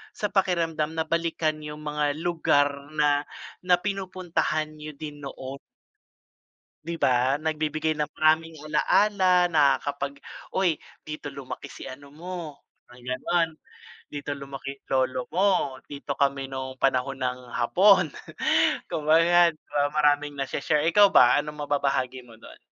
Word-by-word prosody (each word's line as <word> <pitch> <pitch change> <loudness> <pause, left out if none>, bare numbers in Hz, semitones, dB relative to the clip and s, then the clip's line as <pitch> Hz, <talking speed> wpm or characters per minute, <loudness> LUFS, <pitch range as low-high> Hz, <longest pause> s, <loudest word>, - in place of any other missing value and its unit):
sa 210 - -2
pakiramdam 165 -5 0
na 160 - 0
balikan 165 -2 -1
yung 150 0 -8
mga 150 -1 -1
lugar 145 -4 +1
na 145 -1 +2 0.4
na 180 -1 +6
pinupuntahan 180 -6 -2
niyo 150 -1 -8
din 145 -1 -8
noon 135 +1 -8 1.3
di 170 0 -4
ba, 130 -1 +2
nag-bibigay 155 0 -1
ng 150 -1 -2
maraming 160 +1 +2
ala-ala 180 +3 +3
na 145 -3 +5
kapag, 140 0 -3 0.3
"Uy, 180 -5 0 0.2
dito 150 -1 -6
lumaki 140 0 -8
si - - -10
ano 140 +2 -10
mo, 165 -1 -7 0.3
ganon, 130 +7 -1 0.6
dito 145 0 -4
lumaki 140 0 -7
lolo 130 -1 0
mo, 180 -8 +1
dito 140 0 -5
kami 140 -1 0
nung 130 0 -6
panahon 135 0 +1
ng 125 -1 -2
Hapon," 180 - +4 0.7
kumbaga 165 +3 +4
di 160 - -10 0.2
ba, 145 0 +2
maraming 145 -1 +1
na-she-share, 145 +2 0
ikaw 200 +4 +6
ba, 125 -9 +6
anong 150 0 -6
mababahagi 135 -3 -1
mo 115 -2 -16
dun? - - -14
150 Hz, 130 wpm, -26 LUFS, 140-165 Hz, 1.3 s, na